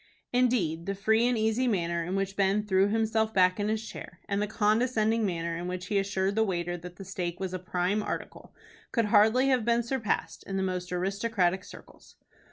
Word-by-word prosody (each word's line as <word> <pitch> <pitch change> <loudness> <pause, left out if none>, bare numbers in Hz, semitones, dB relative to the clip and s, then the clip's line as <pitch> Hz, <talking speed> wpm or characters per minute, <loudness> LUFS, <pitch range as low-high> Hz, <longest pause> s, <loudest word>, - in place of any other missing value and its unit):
Indeed, 205 -10 +1
the 195 - -1
free 220 +4 +2
and 245 -1 +1
easy 220 +4 +1
manner 170 -6 0
in 180 +3 -3
which 195 0 -2
Ben 200 +2 +1
threw 190 -1 +3
himself 220 0 0
back 185 +1 +4
in 205 - 0
his 220 0 -2
chair, - - -9
and 200 0 0
the 210 - 0
condescending 220 +1 +1
manner 170 -2 -2
in 175 +1 -4
which 180 0 -4
he 200 +2 +1
assured 195 0 0
the 220 +2 +2
waiter 175 -3 -2
that 175 +1 -9
the 195 - -10
steak 180 -2 -4
was 190 -1 -3
"a 185 - -3
prime 180 +3 -1
article," - - -6 0.4
could 230 -2 +1
hardly 220 +5 +4
have 255 -3 +2
been 235 +1 +2
surpassed 235 -2 -2
in 195 - -3
the 190 - 0
most 180 -1 -3
aristocratic 190 0 0
circles. - - -15
200 Hz, 200 wpm, -28 LUFS, 180-220 Hz, 0.4 s, back